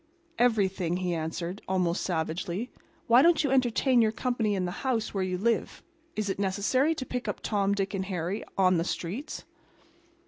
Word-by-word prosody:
"Everything," 195 -7 +2
he 180 -1 -1
answered, 170 +3 -4
almost 180 -2 +1
savagely. 175 +6 -2 0.3
"Why 235 +2 +6
don't 330 0 +5
you 280 - 0
entertain 255 -1 +3
your 220 -1 +3
company 225 -3 0
in 185 -1 -1
the 175 - -2
house 245 -5 -1
where 195 -2 0
you 185 -1 -1
live? 225 +3 -1 0.3
Is 215 -1 -1
it 195 - -2
necessary 215 +10 +1
to 260 - -4
pick 250 -1 -4
up - - -2
Tom, 200 -2 +1
Dick 195 0 -2
and 190 -1 -2
Harry 185 +2 -3
on 185 -2 +4
the - - +1
streets?" 190 - -4
200 Hz, 175 wpm, -28 LUFS, 185-240 Hz, 0.3 s, Why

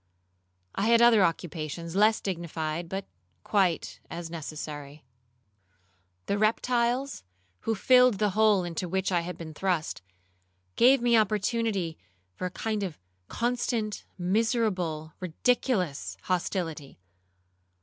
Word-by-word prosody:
I 200 - 0
had 235 0 +6
other 235 -4 +6
occupations 165 0 -3
less 215 +2 +4
dignified, 170 -2 -3
but 195 +1 -4 0.4
quite 190 -5 +1
as 170 0 -6
necessary. 150 -2 -7 1.2
The 200 - -1
reptiles, 240 +4 +1 0.5
who 225 - +2
filled 250 +2 +5
the 210 0 +1
hole 210 -2 +4
into 175 +1 -4
which 190 +2 0
I 175 - +3
had 180 +1 -6
been 160 -2 -8
thrust, 175 - -1 0.7
gave 255 +1 +5
me 240 -1 +4
opportunity 215 -4 +1 0.3
for 180 - -3
a - - -5
kind 215 +3 -3
of 185 -6 -4 0.3
constant, 235 -3 -1
miserable, 185 - 0
ridiculous 185 - 0
hostility. 170 -5 -2
190 Hz, 110 wpm, -28 LUFS, 165-225 Hz, 1.2 s, had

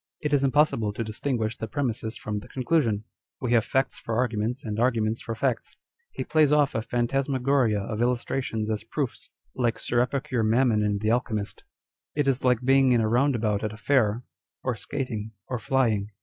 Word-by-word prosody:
It 150 -1 -2
is 140 -1 +3
impossible 135 -7 +2
to 115 - -3
distinguish 110 0 -2
the 110 - -4
premises 115 -2 -2
from 105 -1 -4
the 105 - -12
conclusion. 130 -6 0 0.4
We 125 -2 -2
have 115 -2 +5
facts 135 +2 0
for 115 -1 -3
arguments, 120 +2 -1
and 105 0 -3
arguments 115 -2 +1
for 115 - -4
facts. 120 -1 -2 0.3
He - - -4
plays 155 -2 +3
off 150 -2 +3
a 110 - 0
phantasmagoria 130 -1 +1
of 105 +2 -4
illustrations 120 -2 -1
as 105 -2 -2
proofs, - - -4 0.2
like 120 -2 0
Sir 120 - 0
Epicure 130 -1 -1
Mammon 115 0 +3
in 105 -1 +1
the 110 +2 0
Alchemist. 110 -4 -2 0.5
It 145 -1 +1
is 135 -2 +1
like 125 -1 +2
being 135 -1 +5
in 120 - +4
a 110 - +1
roundabout 115 -4 +1
at 110 0 -2
a - - -10
fair, 115 -1 +2 0.4
or 125 -2 0
skating, 110 -4 -4
or 125 - -3
flying. 110 -6 +1
120 Hz, 180 wpm, -26 LUFS, 110-135 Hz, 0.5 s, have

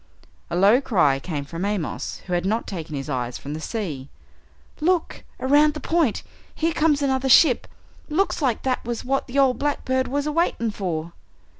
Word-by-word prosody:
A 170 - -3
low 205 +8 +5
cry 160 - +2
came 145 -2 -4
from 165 +5 -6
Amos, 200 -6 -3
who 180 - -4
had 175 0 +1
not 215 +5 0
taken 165 -5 -6
his 135 -1 -5
eyes 125 -4 -3
from 145 - -7
the 155 - -5
sea. 155 - -4 0.7
"Look! 345 +2 0 0.2
Around 295 +3 +4
the - - -4
point! 320 -10 +1 0.3
Here 330 +1 0
comes 300 -2 +2
another 265 -1 +1
ship 260 -1 +6 0.4
looks 335 +3 0
like 255 -6 0
that 260 -1 -1
was 235 -1 -4
what 270 +1 0
the 260 +2 -5
ol' 270 -2 +5
blackbird 260 -2 -1
was 285 +2 -1
a 300 - -1
waiting 295 -8 0
for!" 170 -5 -4
235 Hz, 180 wpm, -23 LUFS, 170-285 Hz, 0.7 s, ship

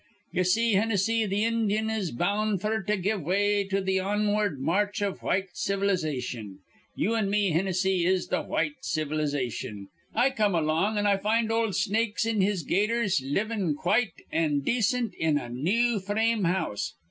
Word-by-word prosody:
"Ye 180 - 0
see, 225 +5 +2
Hinnissy, 220 +2 +2
th' 205 +3 +1
Indyun 220 -1 0
is 200 -6 -2
bound 200 - 0
f'r 215 +2 -1
to 210 0 +2
give 195 +2 -1
way 200 +5 +1
to 195 0 -1
th' 190 0 +1
onward 205 -4 0
march 200 +8 0
iv 200 -2 -2
white 190 0 0
civilization. 150 - -2 0.4
You 220 - 0
an' 215 -3 0
me, 200 -2 +2
Hinnissy, 185 +1 +1
is 185 -1 +2
th' - - -1
white 295 -1 -1
civilization. 145 -9 -2 0.3
I 245 +4 +3
come 210 -6 +1
along, 165 +7 +1
an' 205 - +1
I 200 -1 +3
find 220 +3 +1
ol' 225 -1 +1
Snakes 220 +2 0
in 225 -3 +1
his 190 -3 +1
Gaiters 210 - +1
livin' 190 +3 -1
quite 220 +8 +1 0.2
an' 150 -3 +1
dacint 235 - 0
in 160 -2 +2
a 120 - -5
new 205 - +1
frame 210 +2 0
house. 105 - -1
200 Hz, 160 wpm, -27 LUFS, 170-215 Hz, 0.4 s, I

